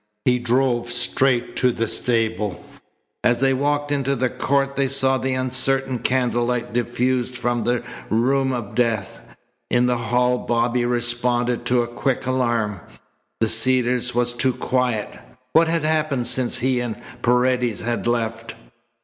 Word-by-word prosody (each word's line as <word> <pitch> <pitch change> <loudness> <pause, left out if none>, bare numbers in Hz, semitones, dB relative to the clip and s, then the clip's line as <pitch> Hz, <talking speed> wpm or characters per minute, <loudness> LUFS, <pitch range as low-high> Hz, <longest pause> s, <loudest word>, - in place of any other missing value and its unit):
He 125 -1 +3
drove 120 0 +1
straight 125 0 0
to 125 - +3
the 115 -1 -2
stable. 115 -3 -1 0.6
As 120 -1 +3
they 135 0 +3
walked 145 +2 0
into 140 -1 +1
the 130 -1 -1
court 140 0 0
they 135 0 +1
saw 130 0 +2
the 130 0 -1
uncertain 130 0 0
candlelight 120 -2 0
diffused 125 +1 -1
from 120 -1 -1
the 120 0 0 0.3
room 130 +4 +2
of 120 -4 -4
death. 110 -5 -1 0.5
In 120 0 +3
the 125 -1 +1
hall 125 +1 +1
Bobby 120 +1 0
responded 120 0 0
to 125 -1 +2
a - - -5
quick 125 +2 -2
alarm. 120 -6 0 0.6
The 110 - +3
Cedars 125 +1 +2
was 120 0 +1
too 130 +1 +1
quiet. 125 -4 -1 0.3
What 165 +1 +5
had 165 -1 0
happened 155 -5 0
since 125 0 +1
he 125 +1 +1
and 120 -3 -4 0.2
Paredes 125 -2 +1
had 120 +1 -2
left? 115 -1 -2
125 Hz, 145 wpm, -22 LUFS, 120-130 Hz, 0.6 s, What